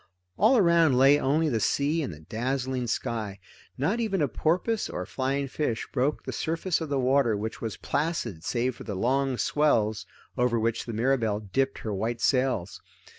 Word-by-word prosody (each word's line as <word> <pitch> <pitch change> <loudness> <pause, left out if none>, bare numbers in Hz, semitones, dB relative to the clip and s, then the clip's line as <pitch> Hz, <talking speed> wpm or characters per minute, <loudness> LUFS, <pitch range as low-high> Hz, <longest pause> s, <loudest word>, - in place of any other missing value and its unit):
All 260 - +4
around 170 - +4
lay 135 +3 +6
only 150 +4 +2
the 120 -7 0
sea 145 +8 +1
and 140 - -3
the 75 -1 -11
dazzling 125 - -2
sky. 110 -4 -3 0.4
Not 175 - 0
even 210 -5 0
a 145 - +2
porpoise 185 - 0
or 90 - -4
flying 135 +5 -2
fish 130 -4 -2
broke 140 +3 0
the - - -5
surface 165 +2 -1
of 160 - -4
the 140 - 0
water 130 -4 +2
which 110 +2 -5
was 110 -3 -4
placid 140 - -2
save 125 +4 -1
for - - -9
the 105 - -5
long 130 +5 +1
swells 115 -9 +1 0.3
over 125 -1 +2
which 115 +1 -1
the 115 - -4
Mirabelle 115 -3 +1
dipped 135 +6 -1
her 110 - -2
white 115 +4 -2
sails. 125 -8 0
130 Hz, 175 wpm, -27 LUFS, 115-145 Hz, 0.4 s, lay